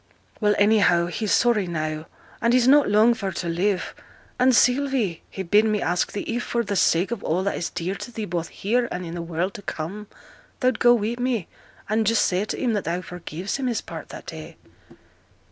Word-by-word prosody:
'Well, 210 -1 +3
anyhow 200 -5 +4
he's 200 +3 -3
sorry 220 -2 +3
now; 155 -2 -3 0.3
and 235 0 +3
he's 250 -1 +4
not 285 -1 +6
long 215 +3 +5
for 200 -4 -4
to 175 - -4
live. 180 +3 -1 0.5
And, 255 0 +5
Sylvie, 250 - +2
he 190 - -5
bid 205 +4 +4
me 215 -1 +1
ask 175 0 0
thee, 205 - -3
if, 240 +1 -3
for 235 -1 -1
the 205 -2 -3
sake 180 +2 +2
of 235 -4 -4
all 175 +4 0
that 200 - -1
is 170 - -3
dear 180 +2 -3
to 200 +5 -8
thee 220 -2 -4
both 170 -3 -3
here, 235 +4 0
and 180 0 -4
i' 165 - -6
th' 175 - -5
world 170 +3 -2
to - - -9
come, 195 +4 -6 0.5
thou'd 255 0 +1
go 240 0 +6
wi' 230 +1 -2
me, 245 -7 -1 0.4
and 215 +1 +1
just 230 0 +3
say 185 +3 0
to - - -4
him 245 -3 0
that 205 - -2
thou 175 +2 -1
forgives 180 - -5
him 265 -2 -2
his 235 -4 -1
part 165 -1 -9
that - - -9
day.' 160 0 -9
205 Hz, 215 wpm, -24 LUFS, 175-235 Hz, 0.5 s, not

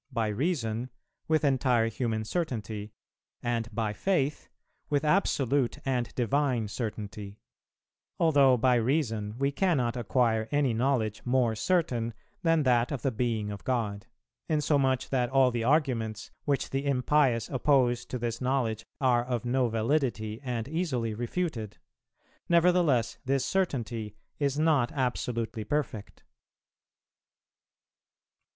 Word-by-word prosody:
By 115 -3 0
Reason, 120 - -1 0.4
with 155 -1 +2
entire 125 -4 +2
human 115 -1 -2
certainty; 110 - -3 0.5
and 115 -1 -1
by 110 -1 -1
Faith, 150 - -1 0.4
with 145 0 +1
absolute 140 - +2
and 125 -3 -1
divine 125 -1 +1
certainty. 105 -2 -5 0.8
Although 140 -6 +5
by 125 +1 +3
Reason 115 -4 -1
we 140 +1 +1
cannot 140 -8 +1
acquire 115 -2 +1
any 145 -4 +2
knowledge 115 -3 0
more 125 -2 +2
certain 120 -4 0 0.3
than 165 -2 +3
that 125 -1 +2
of 135 -5 -4
the 135 - +1
Being 115 -3 -1
of 100 - -8
God; 110 -6 -2 0.4
insomuch 140 -4 +1
that 125 -3 +1
all 130 -1 +4
the 120 -1 -2
arguments, 120 -6 0
which 140 -2 0
the 135 +1 -1
impious 130 -2 +2
oppose 125 -3 +2
to 125 - -4
this 115 0 -3
knowledge 125 -4 0 0.2
are 125 -3 +3
of 125 -1 -3
no 125 0 +1
validity 115 -2 -1
and 120 -4 -3
easily 140 -8 -1
refuted; 120 - -3 0.7
nevertheless 170 -9 +3
this 135 0 +1
certainty 115 - -2 0.2
is 140 -1 0
not 150 -5 +2
absolutely 125 -4 -2
perfect[333:2].. 115 -4 -2
125 Hz, 120 wpm, -29 LUFS, 115-140 Hz, 0.8 s, Although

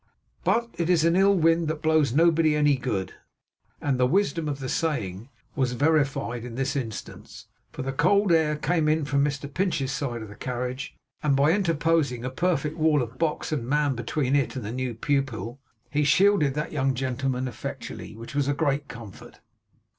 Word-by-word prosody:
But 235 0 +1
it 170 0 0
is 170 -3 +4
an 165 +1 +3
ill 195 +1 +5
wind 165 -1 +3
that 155 0 -3
blows 155 -4 +3
nobody 160 +1 +4
any 150 -1 +4
good; 105 -7 -3 0.7
and 135 -3 -1
the 125 - +4
wisdom 170 -1 +1
of 140 -1 -3
the 135 - -4
saying 120 - -2 0.3
was 130 -3 0
verified 140 -4 +1
in 120 -2 -7
this 135 +3 -1
instance; 115 -6 -6 0.3
for - - -6
the 135 0 -3
cold 200 +7 +3
air 160 -2 +3
came 155 +1 0 0.2
from 140 -1 +1
Mr 140 0 -3
Pinch's 170 -8 0
side 120 -5 -3
of 110 - -10
the - - -9
carriage, 125 - -4 0.3
and 145 -2 +2
by 140 +3 +4
interposing 165 - +1
a 130 - -3
perfect 155 0 -1
wall 155 -4 +3
of 120 +2 -9
box 160 -1 -1
and 135 -7 -2
man 145 -1 +2
between 130 +3 -1
it 140 -2 0
and 125 -5 -5
the 105 - -4
new 125 -1 -3
pupil, 125 -3 -2 0.3
he 150 0 +1
shielded 150 -2 +4
that 150 - -3
young 135 -3 0
gentleman 130 0 -2
effectually; 120 - -7
which 115 +3 -9
was 140 -1 0
a 145 - +1
great 145 -1 0
comfort. 115 -5 -11
140 Hz, 185 wpm, -26 LUFS, 130-160 Hz, 0.7 s, ill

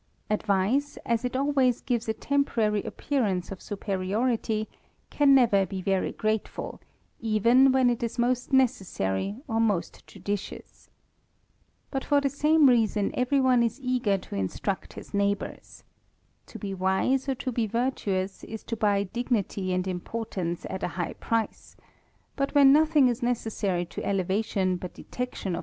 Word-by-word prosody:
Advice, 215 +7 +1
as 235 0 0
it 250 +1 -2
always 265 -3 +2
gives 240 -3 -2
a - - +2
temporary 230 -7 +1
appearance 205 -12 -2
of 195 - -7
superiority, 215 +3 -1 0.4
can 280 -2 +5
never 230 -7 +5
be 190 +1 -5
very 190 0 0
grateful, 215 0 -3 0.4
even 235 +4 +4
when 260 -1 +4
it 240 +1 +1
is 235 +1 -3
most 250 +1 0
_n^essary 205 - 0
or 225 -3 0
most 210 -6 -1
judicious. 205 -1 -6 1.0
But 270 -1 -2
for 290 -1 +3
the 280 -1 0
same 300 +1 +4
reason 220 -5 +2
every 250 +3 +1
pne 255 -3 +4
is 230 +3 -1
eager 250 -6 +1
to 185 - -9
in^.tcucl 100 - -3
his - - -11
neighbours.. 200 0 -2 0.6
To - - -9
be 200 -2 -5
wise 190 +9 +1
or 270 - +1
to 255 +1 -4
be 230 -2 0
virtuous, 205 -5 -2
is 220 -1 -8
to 230 - -4
buy 205 -2 +2
dignity 205 -3 -2
and 185 +1 -1
importance 185 -2 -4
at 190 - -5
a - - 0
high 175 - -2
price; 230 -1 -3 0.6
bat 275 +1 -2
wUea 285 -1 +7
nothing 300 0 +6
is 240 -2 -1
necessary 215 -7 -1
to 170 - -7
elevation 195 0 0
but 180 0 -8
detection 250 -5 -5
ol - - 0
THE 170 - -2
RAMBLER. - - -3
225 Hz, 155 wpm, -27 LUFS, 195-255 Hz, 1.0 s, wUea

